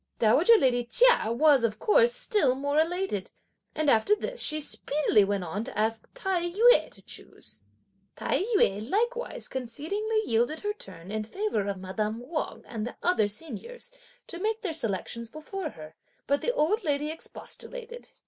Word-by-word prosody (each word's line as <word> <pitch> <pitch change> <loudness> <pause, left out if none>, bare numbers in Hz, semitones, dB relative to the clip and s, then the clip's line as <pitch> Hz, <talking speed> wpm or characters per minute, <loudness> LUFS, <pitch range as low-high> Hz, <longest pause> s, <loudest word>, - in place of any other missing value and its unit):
Dowager 310 - +5
lady 245 - +2
Chia 475 - +4
was, 275 +1 +4
of 215 -2 0
course, 475 - +4
still 430 - +2
more 285 +2 0
elated. 330 - -1 0.5
And 310 -1 0
after 275 - +4
this - - -2
she 310 - +4
speedily 290 -6 +2
went 200 -1 -1
on 190 +6 -4
to - - -6
ask 220 +1 -1
Tai 375 -7 -1
yü 460 +7 +5
to - - -11
choose. - - -6 0.5
Tai - - 0
yü 210 - +2
likewise 475 +6 -1
concedingly 360 - -2
yielded 240 +7 +1
her 415 0 -2
turn 185 - -9
in 215 0 -2
favour 225 - -2
of 200 -1 -2
madame 210 +4 -3
Wang 315 -1 -4
and 220 -2 -5
the - - -8
other 345 - +3
seniors, 330 - -5 0.3
to 345 - -6
make 440 +4 -2
their 360 -5 -2
selections 230 - -2
before 310 - -6
her, 155 - -12 0.3
but 280 +1 +1
the 485 - +1
old 425 0 +1
lady 295 -1 0
expostulated. 475 +8 -8
305 Hz, 160 wpm, -27 LUFS, -, 0.5 s, Dowager